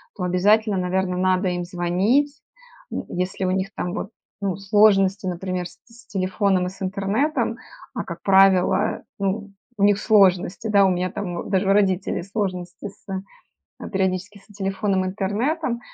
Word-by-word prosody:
то 180 - -5
обязательно, 200 +3 +3
наверно, 180 0 -1
надо 185 0 +2
им 175 0 -2
звонить. 195 - +1 0.5
М. - - -3
Если 180 +1 -2
у 185 - +1
них 190 +1 -1
там, 180 - -3
вот, 205 - -4 0.3
ну, 195 -3 -1
сложности, 195 -1 +3
например, 180 0 -3
с - - -18
с 230 -1 -19
телефоном 190 -1 0
и - - -3
с 195 +1 -15
интернетом. 200 - 0 0.4
А - - -3
как - - -8
правило, 195 +1 +4 0.2
ну, 200 +1 -2 0.3
у 200 - 0
них 205 0 +4
сложности, 195 -1 +3
да. 200 -2 +5
У - - +4
меня, 180 0 -1
там, 175 -3 -5
даже 195 0 +2
у 195 - +6
родителей 190 -3 +1
сложности 185 -2 -4
с 195 - -22
э, 195 - -7 0.5
периодически 190 +1 -1
с - - -23
телефоном, 195 -1 -1
интернетом, 235 - -1
195 Hz, 160 wpm, -23 LUFS, 185-205 Hz, 0.5 s, у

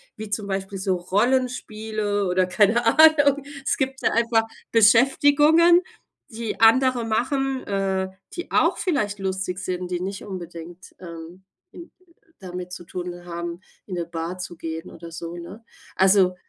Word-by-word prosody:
wie 220 -2 -8
zum 205 0 -3
Beispiel 195 0 -4
so 190 -1 0
Rollenspiele 215 0 -1
oder 185 +1 +2
keine 210 +5 +2
Ahnung. 290 +1 +5 0.2
Es - - +1
gibt 265 -1 -2
ja - - +2
einfach 230 -1 +2 0.3
Beschäftigungen, 290 - +5 0.5
die 225 -1 -5
andere 250 +2 +4
machen, 265 +4 -1
äh, 190 -1 -1 0.2
die 345 +1 -7
auch - - +3
vielleicht 210 - -1
lustig 190 -1 -3
sind, 180 -1 -4
die 180 0 -3
nicht 195 +1 -5
unbedingt, 175 -2 -9
ähm, 170 +1 -10 0.3
in 340 -1 -12 0.5
damit 180 -1 -7
zu 175 - -8
tun 175 0 -7
haben, 170 0 -6 0.2
in 185 - -6
'ne 170 - -3
Bar 170 +2 -5
zu 175 -1 -6
gehen 160 0 -6
oder 165 0 -11
so, 170 +1 -7
ne? 190 +7 -10 0.3
Also 190 -1 +4
195 Hz, 145 wpm, -23 LUFS, 180-235 Hz, 0.5 s, Ahnung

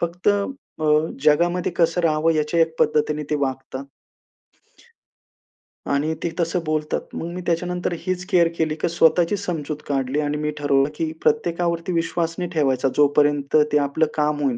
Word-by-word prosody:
फक्त 170 +3 -1 0.5
अ, - - -1 0.4
जगामध्ये 170 +4 +2
कसं 170 +1 +2
राहावं 160 -1 +2
याच्या 155 +2 0
एक 160 0 +2
पद्धतीने 150 0 +1
ते - - +2
वागता. 135 -1 -3 2.1
आणि 145 +3 +1
ते 170 - 0
तसं 170 +1 0
बोलतात. 155 0 -1
मग 165 - -4
मी 180 - -5
त्याच्यानंतर 180 +1 -1
हीच 185 -1 -3
केअर 175 -4 +4
केली, 155 -1 0
की - - +1
स्वतःची 170 +3 +3
समजूत 160 -6 -4
काढली 135 0 -1
आणि 150 0 -1
मी 150 0 -2
ठरवलं 140 -1 +2
की 160 0 -2
प्रत्येकावरती 170 -5 0
विश्वास 165 0 -1
नाही 180 -1 -3
ठेवायचा. 135 -4 +1
जोपर्यंत 145 0 +2 0.2
ते 150 - +4
आपलं 145 +2 +1
काम 150 -1 0
होईल. 130 -4 +1
155 Hz, 150 wpm, -22 LUFS, 145-170 Hz, 2.1 s, केअर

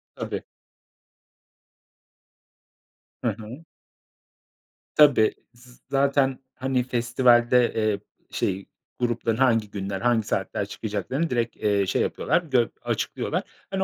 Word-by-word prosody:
Tabii. - - -4 2.8
Hı - - +1
hı. 120 +9 -9 1.3
Tabii, 140 -8 +6 0.2
z 125 +1 -18
zaten 135 -1 +2 0.2
hani 130 -1 0
festivalde, 120 0 +3
eee, 110 -2 +1 0.3
şey, 95 0 -1 0.3
grupların 120 -2 0
hangi 115 -5 +3
günler 95 -1 -4
hangi 115 -3 +2
saatler 100 +1 -1
çıkacaklarını 110 +10 -3
direkt, 120 -2 -1
eee, 100 -2 +1
şey - - 0
yapıyorlar 165 +5 +1
gö 130 -8 +2
açıklıyorlar. - - -2 0.3
Hani, 190 0 0
120 Hz, 100 wpm, -25 LUFS, 110-130 Hz, 2.8 s, Tabii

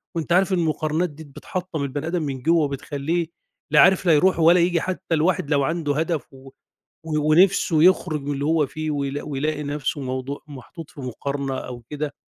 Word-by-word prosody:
وأنت 165 0 -3
عارف 190 +1 +3
المقارنات 160 0 0
دي 150 +2 -12
د 140 -3 -17
بتحطّم 180 -5 -5
البني 145 +3 -4
آدم 175 0 -1
من 135 -3 -4
جوّه 165 +3 +3
وبتخلّيه 145 +4 -2 0.4
لا 150 - +5
عارف 190 0 +5
لا 170 - +5
يروح 175 +5 +3
ولا 170 +2 +6
ييجي، 170 -1 +2
حتّى 180 -3 -2
الواحد 155 -2 +1
لو 140 -2 +3
عنده 150 -1 -1
هدف 160 -5 -2
و 135 0 -13 0.6
و 155 -1 0
ونِفْسه 175 -2 +4
يخرُج 175 -5 +3
من 145 +1 -2
اللي 140 +1 -3
هو 155 -1 +2
فيه 155 +2 -4
ويلا 140 -1 -3
ويلاقي 150 +1 -2
نَفْسه 145 0 -3
موضوع 130 +2 -4
محطوط 145 +4 -10
في 140 - -11
مقارنة 135 +2 -4
أو 125 -2 -7
كده، 150 -1 -4
150 Hz, 190 wpm, -23 LUFS, 140-165 Hz, 0.6 s, ولا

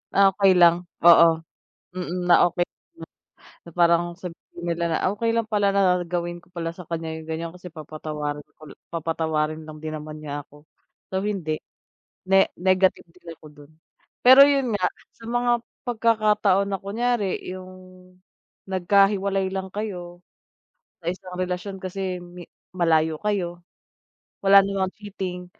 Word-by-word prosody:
Ah, 200 0 +6
okay 195 -2 +4
lang 175 0 +4 0.2
oo, 170 -1 +9 0.7
mm. 180 0 -3
Na 175 - +7
okay 175 0 -1 1.0
na 170 - -13
parang 170 +1 +2
sabihin 175 -1 -9
nila 170 0 -1
na, 160 - +1 0.2
Okay 230 +2 0
lang 230 -1 0
pala 205 -2 +1
na 185 -2 +3
gawin 175 0 -4
ko - - -26
pala 170 -1 -4
sa 180 - -10
kanya 160 -1 -3
'yung 160 0 -9
ganyan, 165 +1 -3
kasi 180 -1 -11
papatawarin, 150 -1 -5 0.2
ul 155 -1 -12 0.2
papatawarin 160 -1 -2
lang 155 0 -10
din 155 0 -6
naman 155 0 -7
niya 145 -1 -5
ako. 145 +2 -20 0.4
So, 190 0 -3
hindi. 180 -7 -3 0.7
Ne 195 0 +6
negative 185 -1 +1
din 180 +1 -24
ako 155 - -19
doon. 145 0 -17 0.5
Pero 260 +3 +9
'yun 275 -3 +2
nga, 185 - 0 0.3
sa 230 - -13
mga 240 +1 0 0.4
pagkakataon 210 -4 +2
na 195 - -1
kunwari 210 0 -1
'yung 185 0 -8 1.0
nagkahiwalay 195 +1 +2
lang 190 0 -5
kayo 180 -4 -6 0.8
sa 170 - 0
isang 185 -1 -9
relasyon 185 +2 -3
kasi 185 -1 -4
mi 175 0 -12 0.2
malayo 160 -3 +1
kayo, 180 -5 -2 0.8
wala 195 0 +7
namang 190 -1 -1
cheating, 190 -3 -6
180 Hz, 145 wpm, -24 LUFS, 165-195 Hz, 1.0 s, oo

